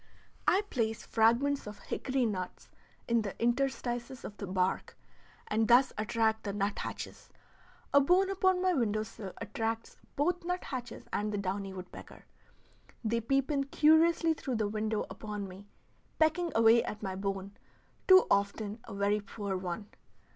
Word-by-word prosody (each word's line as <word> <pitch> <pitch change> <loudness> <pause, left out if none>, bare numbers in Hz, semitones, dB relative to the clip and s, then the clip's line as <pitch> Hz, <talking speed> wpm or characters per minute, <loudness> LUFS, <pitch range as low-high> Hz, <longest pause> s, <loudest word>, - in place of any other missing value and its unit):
I 390 +3 +4
place 225 -3 -1
fragments 235 +4 +2
of 210 0 -7
hickory 260 -2 -1
nuts 185 -5 -4 0.4
in 235 -1 +3
the 200 -3 -6
interstices 240 0 -1
of 205 - -7
the 200 - -5
bark, 185 0 -1 0.5
and 220 +1 +1
thus 245 +4 +5
attract 220 +1 0
the 200 - -3
nut 205 0 -1
hatches; - - -6 0.6
a 280 - +7
bone 370 +6 +3
upon 375 -1 +2
my 370 -1 +3
window 215 -7 +1
sill 215 -3 -8
attracts 225 +2 -3 0.2
both 355 +5 0
nut 360 +1 -2
hatches 250 -3 -6
and 210 +1 0
the 205 - -2
downy 195 0 -3
woodpecker. 185 -1 -10 0.8
They 230 +1 0
peep 270 +5 +1
in 275 -2 +1
curiously 320 +3 +4
through 265 -4 -4
the 215 -2 0
window 215 +1 -1
upon 210 -2 -6
me, 190 +2 -12 0.5
pecking 325 +2 +2
away 225 +1 +6
at 210 0 -6
my 190 -1 -3
bone, 195 0 -4 0.5
too 375 -1 +8
often 200 +2 0
a - - -8
very 200 +1 +2
poor 200 -1 -4
one. 185 +2 -4
225 Hz, 155 wpm, -31 LUFS, 205-275 Hz, 0.8 s, too